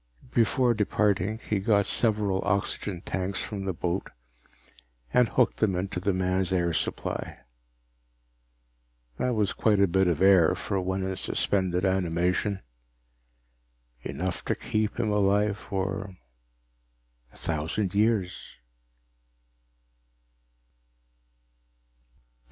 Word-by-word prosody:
Before 120 +1 +3
departing, 105 -1 +1
he 105 - +1
got 100 0 +2
several 105 -4 +1
oxygen 100 -2 -1
tanks 95 0 -3
from 100 -3 -5
the 95 - 0
boat 90 +3 -2 1.0
and 125 -2 +4
hooked 125 - +2
them 100 -4 +1
into 90 0 -2
the 100 +2 0
man's 95 0 0
air 85 -2 +1
supply. - - -3 1.8
That 125 -1 0
was 105 -3 +1
quite 105 -3 +2
a 100 - +6
bit 95 +2 +2
of 85 -4 +1
air 95 -4 +5
for 95 - -2
one 95 +1 -2
in 95 0 -2
suspended 95 -2 0
animation. 95 +1 0 1.4
Enough 90 +7 -4
to - - 0
keep 110 +1 -2
him 110 -3 +1
alive 105 0 +2
for 95 -1 -4 1.2
a - - -20
thousand 85 +5 -2
years. 105 -3 +2
95 Hz, 105 wpm, -27 LUFS, 90-105 Hz, 1.8 s, a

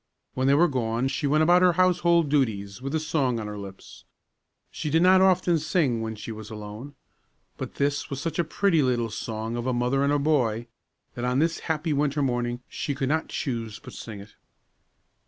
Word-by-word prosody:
When 130 +1 0
they 140 - +5
were 170 +4 +5
gone 125 -2 -1
she 145 - -1
went 155 +2 +3
about 175 +3 +5
her 180 -1 +5
household 175 -2 +3
duties 110 -8 -1
with 135 +3 -3
a - - +2
song 135 -6 0
on 110 - -5
her 105 0 -6
lips. 95 -1 -11 0.7
She 150 - -4
did 160 +3 +3
not 185 +1 +6
often 180 -3 +3
sing 150 -7 +1
when 110 0 -4
she 110 - -7
was 110 -1 -8
alone; 110 +6 -8 0.6
but - - -7
this 145 +1 -1
was 140 -2 -4
such 165 +2 -3
a - - +4
pretty 165 0 +2
little 120 -4 0
song 110 +1 -4
of 120 +1 -3
a 130 - +1
mother 125 +3 +1
and 140 +1 +2
her 145 - +3
boy, 125 -7 +1 0.5
that 120 - -6
on 125 +1 +1
this 165 +3 +1
happy 160 0 0
winter 145 0 +1
morning 120 -1 -1
she 145 - -4
could 135 -1 -1
not 160 +2 0
choose 115 -6 -4
but - - -12
sing 110 -3 -8
it. 100 - -14
135 Hz, 205 wpm, -26 LUFS, 115-155 Hz, 0.7 s, not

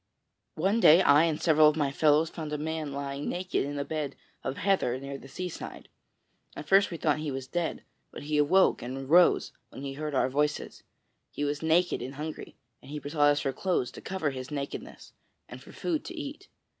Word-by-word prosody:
One 195 +8 +1
day 175 -2 +7
I 145 +3 +6
and 160 -2 -1
several 155 -2 +5
of 150 - -2
my 145 -3 0
fellows 155 +2 +3
found 155 -3 -6
a 150 - -1
man 155 -1 -3
lying 140 0 -4
naked 180 +1 -1
in 145 +1 -4
a 140 - -2
bed 150 -3 -3 0.3
of 135 +1 -3
heather 185 -11 +1
near 140 0 -7
the - - -12
seaside. 180 +5 -7 0.7
At 150 - -8
first 195 +3 +5
we 170 - -5
thought 155 -1 +1
he 155 -1 -3
was 135 -1 -4
dead, 170 +5 -3 0.3
but - - -9
he 150 0 0
awoke 180 +6 +4
and 125 +2 -5
arose 155 +7 +4 0.2
when 135 - -10
he 135 -1 -4
heard 150 0 -4
our 130 - +3
voices. 150 +3 -1 0.5
He 145 - -5
was 145 0 -1
naked 165 +3 +2
and 130 +2 -6
hungry, 155 +2 -7 0.3
and - - -14
he 150 - -5
besought 145 +1 +2
us 145 0 +2
for 135 -2 -1
clothes 130 -5 -1
to - - -11
cover 185 -6 -2
his 130 -1 -7
nakedness 140 -1 -6 0.3
and - - -10
for - - -14
food 325 -4 -2
to 355 - -7
eat. 305 +7 -7
150 Hz, 205 wpm, -28 LUFS, 140-165 Hz, 0.7 s, day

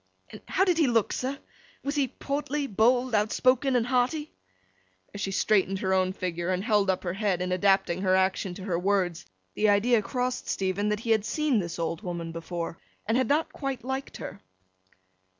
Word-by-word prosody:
'And - - -10
how 380 - +2
did 355 -3 +2
he 310 - +4
look, 230 -4 +2
sir? 265 +2 -2 0.5
Was 280 - -2
he 285 -3 +1
portly, 285 +2 -3
bold, 245 +2 +2
outspoken, 255 +5 +2
and 235 -2 +2
hearty?' 260 +5 0 0.8
As 205 - -6
she 195 - -1
straightened 195 0 +2
her 190 0 0
own 185 0 +2
figure, 175 -2 -3
and 185 0 0
held 210 -3 +2
up 185 - 0
her 175 -2 -2
head 195 -2 0
in 180 0 -2
adapting 185 -1 +2
her 185 -1 +3
action 190 -1 +1
to 190 - -8
her 180 -4 -1
words, 180 - 0 0.3
the 215 - +2
idea 215 +3 +4
crossed 250 +3 -2
Stephen 195 +2 0
that 210 0 -1
he 230 - -1
had 220 -2 +3
seen 295 0 +1
this 170 -3 -4
old 165 0 -2
woman 170 -4 -4
before, 165 0 -5 0.3
and 225 - +1
had 255 -1 +2
not 300 +5 +1
quite 275 -3 -4
liked 265 +2 -4
her. - - -8
210 Hz, 190 wpm, -27 LUFS, 185-255 Hz, 0.8 s, he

